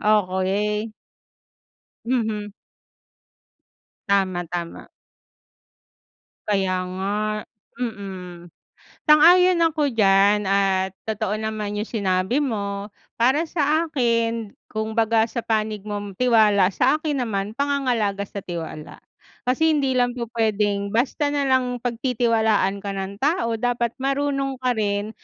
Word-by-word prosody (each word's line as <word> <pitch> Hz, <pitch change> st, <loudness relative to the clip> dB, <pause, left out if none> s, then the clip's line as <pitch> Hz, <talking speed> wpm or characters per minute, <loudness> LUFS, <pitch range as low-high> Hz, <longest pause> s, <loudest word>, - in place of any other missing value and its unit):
Okey. 210 Hz, +1 st, +1 dB, 1.1 s
Mhm. 220 Hz, -4 st, -2 dB, 1.5 s
Tama, 190 Hz, -3 st, +1 dB
tama. 170 Hz, 0 st, -6 dB, 1.6 s
Kaya 190 Hz, -3 st, 0 dB
nga, 190 Hz, +2 st, -3 dB, 0.7 s
mm. 185 Hz, -6 st, -6 dB, 0.5 s
Sang-ayon 350 Hz, +4 st, +6 dB
ako 300 Hz, -3 st, 0 dB
diyan 205 Hz, -1 st, +4 dB
at 190 Hz, -1 st, +1 dB
totoo 215 Hz, -1 st, -2 dB
naman 215 Hz, -1 st, -3 dB
yung 215 Hz, -, -2 dB
sinabi 190 Hz, +2 st, 0 dB
mo. 205 Hz, -7 st, -2 dB, 0.3 s
Para 265 Hz, +7 st, +3 dB
sa 315 Hz, +1 st, +1 dB
akin 230 Hz, -6 st, 0 dB, 0.2 s
kumbaga 220 Hz, +1 st, +1 dB
sa 235 Hz, 0 st, -4 dB
panig 215 Hz, -2 st, -1 dB
mong 205 Hz, -2 st, -5 dB
tiwala, 215 Hz, -5 st, +4 dB
sa 265 Hz, +9 st, +2 dB
akin 295 Hz, -3 st, -1 dB
naman 200 Hz, -4 st, -2 dB
pangangalaga 250 Hz, -8 st, 0 dB
sa 200 Hz, -, -8 dB
tiwala 165 Hz, -3 st, -7 dB, 0.4 s
kasi 290 Hz, +6 st, +2 dB
hindi 275 Hz, -3 st, +1 dB
lang 245 Hz, 0 st, +1 dB
po 235 Hz, -, -3 dB
pwedeng 205 Hz, -2 st, +1 dB
basta 265 Hz, +5 st, +1 dB
nalang 260 Hz, -3 st, +1 dB
pagtitiwalaan 230 Hz, -5 st, +1 dB
ka 200 Hz, -, -4 dB
ng 195 Hz, +1 st, -5 dB
tao, 275 Hz, -6 st, +1 dB
dapat 240 Hz, -1 st, 0 dB
marunong 275 Hz, 0 st, -1 dB
ka 250 Hz, -, +2 dB
rin 205 Hz, -1 st, -1 dB
220 Hz, 105 wpm, -23 LUFS, 200-250 Hz, 1.6 s, Sang-ayon